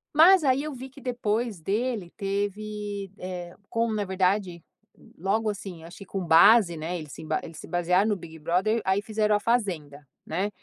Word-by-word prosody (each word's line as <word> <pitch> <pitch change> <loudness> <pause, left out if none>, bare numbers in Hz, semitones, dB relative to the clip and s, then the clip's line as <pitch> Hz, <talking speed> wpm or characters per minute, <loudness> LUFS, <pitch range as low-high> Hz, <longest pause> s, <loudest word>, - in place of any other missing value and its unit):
Mas 345 +2 +7
aí 265 +1 +2
eu 305 -1 -4
vi 260 +1 -8
que 275 - -15
depois 230 -5 -2
dele 210 -1 -2
teve, 205 0 -3
eh, 180 -1 -6
como 230 -1 0
na 210 -1 0
verdade, 185 -2 0 0.5
logo 215 +5 0
assim, 190 -5 -6
acho 170 +2 -11
que 195 - -9
com 190 -1 -4
base, 175 +3 +6
né, 165 +3 -3
eles 155 -3 -9
se - - -9
emba 155 0 -1
eles 160 -1 -9
se - - -10
basearam 180 +4 +2
no 205 - +2
Big 160 -3 -10
Brother, 195 +8 +1
aí 190 +2 +1
fizeram 215 0 +1
a 205 - +2
fazenda, 175 -11 -1 0.2
né. 190 +6 -1
200 Hz, 185 wpm, -26 LUFS, 175-220 Hz, 0.5 s, Mas